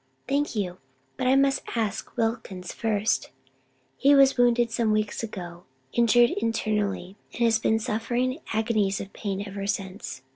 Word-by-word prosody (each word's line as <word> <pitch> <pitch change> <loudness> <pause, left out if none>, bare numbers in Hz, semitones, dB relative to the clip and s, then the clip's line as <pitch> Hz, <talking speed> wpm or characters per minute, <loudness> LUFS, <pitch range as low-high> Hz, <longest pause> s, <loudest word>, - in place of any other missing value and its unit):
"Thank 285 0 0
you, 185 -4 -2 0.4
but 255 - -1
I 260 - +5
must 275 0 +3
ask 220 +1 -3
Wilkins 225 -6 -2
first. 215 -1 0 0.7
He 280 +1 +5
was 275 -1 +6
wounded 240 -1 +3
some 230 -1 +1
weeks 215 -1 0
ago; 180 -6 -7 0.3
injured 235 0 +5
internally, 210 -3 -1 0.2
and 235 - -1
has 225 -1 +4
been 220 0 +2
suffering 240 +5 -1
agonies 215 -3 +1
of 195 - -8
pain 200 -2 -3
ever 200 0 -5
since. 195 -8 -4
220 Hz, 145 wpm, -26 LUFS, 200-240 Hz, 0.7 s, was